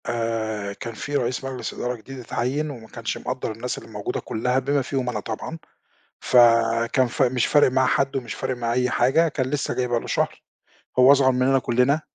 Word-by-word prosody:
آآ 110 -3 -2
كان 115 +3 -7
في 145 +6 -5
رئيس 125 -2 -1
مجلس 135 -1 -5
إدارة 125 0 -3
جديد 130 +3 -10
اتعيّن 130 +5 -2
وما 120 -6 -9
كانش 115 -2 -4
مقدّر 125 -2 -4
الناس 115 +3 -4
اللي - - -11
موجودة 105 -2 -4
كلها 125 +4 -1
بما 140 +2 0
فيهم 130 -1 -2
أنا - - -2
طبعًا 135 +9 -6 0.6
ف - - -1 0.6
كان 130 -2 +3
ف 130 +5 -1
مش 125 -2 +2
فارق 145 -3 +4
معاه 130 0 +2
حد، 135 +2 +1
ومش 120 -6 -4
فارق 130 -1 -3
معاه 115 -1 -2
أي 125 +1 +1
حاجة 135 +9 +3
كان 135 -3 -2
لسه 145 -1 -1
جاي 125 - 0
بقى 120 -1 +1
له - - -9
شهر، - - -1 0.6
هو 130 +2 +8
أصغر 135 -2 +5
مننا 130 +1 +2
كلنا 125 +5 +2
125 Hz, 205 wpm, -23 LUFS, 115-135 Hz, 0.6 s, هو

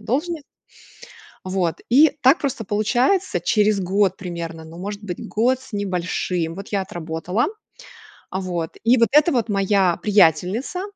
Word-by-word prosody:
должность 295 +7 -2 1.0
вот, 185 -3 -1
и 295 +5 +6
так 265 +5 +6
просто 260 -5 -3
получается 240 - +1
через 210 +2 +2
год 190 +1 +1
примерно 170 -3 -6
Ну 165 +2 -12
может 205 +2 -6
быть 180 -4 -6
год 250 +4 +1
с 260 - -16
небольшим 180 -3 -2
вот 195 - -8
я 200 -2 -1
отработала, 175 +4 -2 0.8
а, 190 - -3
вот, 175 -3 -3
и 245 +2 +4
вот 230 -3 +3
это 300 +4 +5
вот 235 -4 0
моя 195 -3 +2
приятельница. 205 - +2
200 Hz, 140 wpm, -21 LUFS, 180-240 Hz, 1.0 s, и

